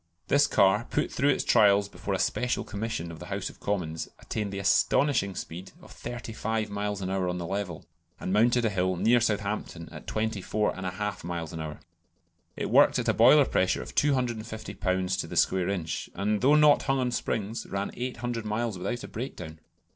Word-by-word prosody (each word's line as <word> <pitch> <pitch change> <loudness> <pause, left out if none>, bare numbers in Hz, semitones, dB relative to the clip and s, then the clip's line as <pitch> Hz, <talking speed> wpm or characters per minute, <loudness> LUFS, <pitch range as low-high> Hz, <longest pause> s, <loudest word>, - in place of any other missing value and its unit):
This 145 0 +5
car, 105 0 +3
put - - 0
through 140 +3 +2
its 140 - +2
trials 100 -3 +5
before 100 -1 -4
a - - 0
Special 125 +5 0
Commission 100 -5 -4
of 80 - -10
the - - -9
House - - -3
of - - -22
Commons, 80 -6 -2
attained 105 -2 -4
the 100 - -5
astonishing 100 +1 +2
speed 90 +3 -7
of - - -15
35 110 -2 -4
miles 100 -1 -3
an 95 - -2
hour 95 -2 0
on 90 - -2
the 85 - -4
level, 95 -3 -4 0.3
and 95 - -3
mounted 120 +3 +4
a 110 - +1
hill 95 -1 0
near 115 +7 +3
Southampton 100 -6 -2
at - - -10
24 110 -1 -1
1/2 95 +2 -4
miles 85 -1 -4
an 80 - -5
hour. 75 -1 -6 0.8
It - - -3
worked - - +6
at - - 0
a - - +4
boiler 135 +5 +7
pressure 95 -6 +1
of - - -10
250 115 -7 -1
lbs. 95 -1 -1
to - - -2
the - - -7
square 95 -1 +2
inch, 85 -5 -3
and 105 +2 0
though 140 +4 +5
not 150 -1 +6
hung 135 -1 +1
on 125 -1 0
springs, 110 -2 -3
ran 100 0 -3
800 120 -2 -4
miles 110 -2 -2
without 120 +6 -3
a - - -6
breakdown. 80 -10 -7
105 Hz, 190 wpm, -28 LUFS, 95-120 Hz, 0.8 s, boiler